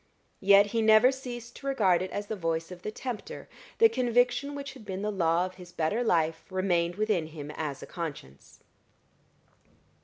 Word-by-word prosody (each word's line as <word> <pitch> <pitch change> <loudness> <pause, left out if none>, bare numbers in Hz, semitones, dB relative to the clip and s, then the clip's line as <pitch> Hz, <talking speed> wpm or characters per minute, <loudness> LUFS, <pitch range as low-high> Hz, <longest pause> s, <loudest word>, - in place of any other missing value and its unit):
Yet 200 +1 +6
he 230 - +2
never 220 +3 +6
ceased 245 -3 -8
to 275 - -8
regard 200 -10 +3
it 185 - -3
as 205 +2 -4
the 220 - -4
voice 165 -2 -2
of 180 -1 -9
the - - -4
tempter: 255 - -6 0.3
the 455 - +7
conviction 250 - +1
which 280 -1 -6
had 260 -4 -13
been 195 -1 -5
the 210 - -1
law 170 -2 +2
of 185 - -7
his 175 -1 -12
better 175 +9 0
life 165 -6 +1
remained 175 -2 0
within 210 -6 0
him 150 -2 -8
as 150 -3 -5
a - - -6
conscience. 145 - -8
195 Hz, 180 wpm, -28 LUFS, 170-240 Hz, 0.3 s, the